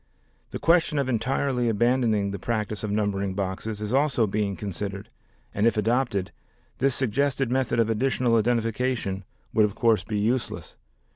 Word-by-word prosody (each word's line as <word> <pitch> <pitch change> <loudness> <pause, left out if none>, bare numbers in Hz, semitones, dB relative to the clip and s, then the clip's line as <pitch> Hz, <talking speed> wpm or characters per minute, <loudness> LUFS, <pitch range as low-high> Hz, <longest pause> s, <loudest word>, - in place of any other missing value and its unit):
The - - -5
question 165 -2 +3
of 140 -2 +1
entirely 125 +1 0
abandoning 115 -2 +2
the 100 - -5
practice 110 0 -2
of 105 - -2
numbering 100 -2 -1
boxes 100 +2 -3
is 105 +2 -3
also 135 -4 +3
being 100 -1 -1
considered 100 0 -5 0.4
and 105 +3 +2
if 115 - +1
adopted, 115 -3 0 0.5
this 135 -1 +2
suggested 135 +1 0
method 130 -2 +1
of 115 - +3
additional 120 +1 +1
identification 115 -3 0 0.3
would 110 - +4
of 105 -1 -4
course 110 -5 +3
be 105 +2 -3
useless. 115 +4 -2
115 Hz, 150 wpm, -25 LUFS, 105-125 Hz, 0.5 s, would